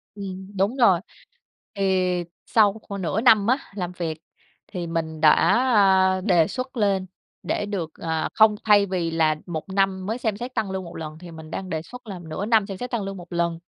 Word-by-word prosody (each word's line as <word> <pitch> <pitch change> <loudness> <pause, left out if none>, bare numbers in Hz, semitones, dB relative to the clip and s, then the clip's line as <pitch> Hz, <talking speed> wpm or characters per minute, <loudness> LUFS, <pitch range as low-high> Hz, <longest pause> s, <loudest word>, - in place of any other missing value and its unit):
Ừm, 190 -1 -7
đúng 200 +6 +1
rồi. 195 -9 +5 0.8
Thì 185 -2 +1 0.2
sau 210 -3 +4
khoảng 200 -1 -7
nửa 190 +5 -1
năm 220 -5 +5
á, 255 +3 +4 0.2
làm 180 -3 -3
việc 165 -3 -4 0.5
thì 175 -4 -5
mình 160 -1 -3
đã, 155 -1 +8 0.8
a, 185 - -3
đề 175 -5 +3
xuất 255 0 -5
lên 195 -3 +1 0.4
để - - -1
được, 185 -6 -4
à 160 -1 -2
không, 215 -1 +5
thay 205 -2 +6
vì 180 -3 -2
là 160 -2 +2
1 170 +1 -5
năm 190 -1 0
mới 220 +4 -2
xem 220 -4 -2
xét 245 +2 -6
tăng 215 -4 -1
lương 190 0 -3
1 170 0 -10
lần 155 -1 -7
thì 175 -1 -10
mình 160 -1 -11
đang 185 +1 -5
đề 160 -2 -2
xuất 250 +6 -12
là 190 -4 -6
nửa 160 +5 -4
năm 220 -2 +3
xem 195 -2 -6
xét 250 - -5
tăng 235 -4 -1
lương 195 0 -5
1 175 0 -10
lần. 170 -1 0
190 Hz, 210 wpm, -24 LUFS, 170-205 Hz, 0.8 s, đã